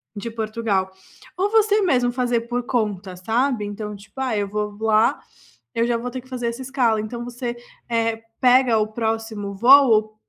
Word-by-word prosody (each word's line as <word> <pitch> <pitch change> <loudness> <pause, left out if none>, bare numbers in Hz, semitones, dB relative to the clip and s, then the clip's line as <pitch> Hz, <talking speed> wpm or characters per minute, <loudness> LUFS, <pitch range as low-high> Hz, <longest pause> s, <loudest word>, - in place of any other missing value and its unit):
de 230 +3 -5
Portugal. 215 -4 -1 0.5
Ou 395 +2 +1
você 430 -1 +3
mesmo 250 -9 +2
fazer 245 -2 0
por 240 +1 -3
conta, 205 -7 -2
sabe. 225 +4 0
Então 210 0 -6
tipo: 200 +6 -13
"Ah 245 -5 0
eu 200 -1 -1
vou 210 0 -3
voar, 220 0 +2 0.5
eu 230 +1 +1
já 235 -1 +1
vou 245 +1 -5
ter 255 0 -5
que 260 - -21
fazer 245 -2 -3
essa 235 +3 -4
escala", 250 -5 +1
então 235 +2 -6
você, 240 0 -5 0.3
eh, 230 -1 0 0.2
pega 250 -2 +5
o 215 0 +1
próximo 220 -2 -3
voo 230 -3 +5
230 Hz, 175 wpm, -22 LUFS, 215-250 Hz, 0.5 s, pega